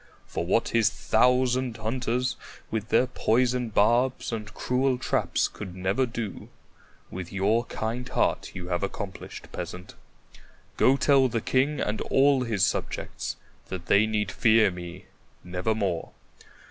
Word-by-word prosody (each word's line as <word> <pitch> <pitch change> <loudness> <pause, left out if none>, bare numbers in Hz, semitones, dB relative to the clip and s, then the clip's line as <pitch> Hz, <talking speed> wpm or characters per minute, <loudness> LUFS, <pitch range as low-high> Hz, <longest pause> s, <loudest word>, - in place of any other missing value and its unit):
For - - -3
what 95 +6 +1
his 115 -4 +3
thousand 125 +4 +2
hunters 120 +2 -1 0.4
with 110 -1 -3
their 120 +3 +4
poisoned 125 -1 0
barbs 120 +6 +2
and 105 -2 -5
cruel 125 +4 0
traps 125 - 0
could 95 -3 -9
never 95 +8 0
do, 115 -3 -6 0.6
with 90 -1 -6
your 105 +5 +1
kind 120 +4 -4
heart - - 0
you 90 -1 -6
have 85 -1 0
accomplished, 100 -1 -6
Peasant. 90 +1 -7 0.8
Go 135 +2 +4
tell 135 -2 +4
the 115 -2 -1
king 135 +6 +1
and 105 +1 -1
all 135 0 +3
his 110 -6 +1
subjects - - -3 0.3
that 95 -2 -6
they 105 +2 +4
need 105 -3 -1
fear 110 -3 +4
me 90 0 -8 0.4
nevermore. 90 -1 -1
110 Hz, 135 wpm, -27 LUFS, 95-125 Hz, 0.8 s, their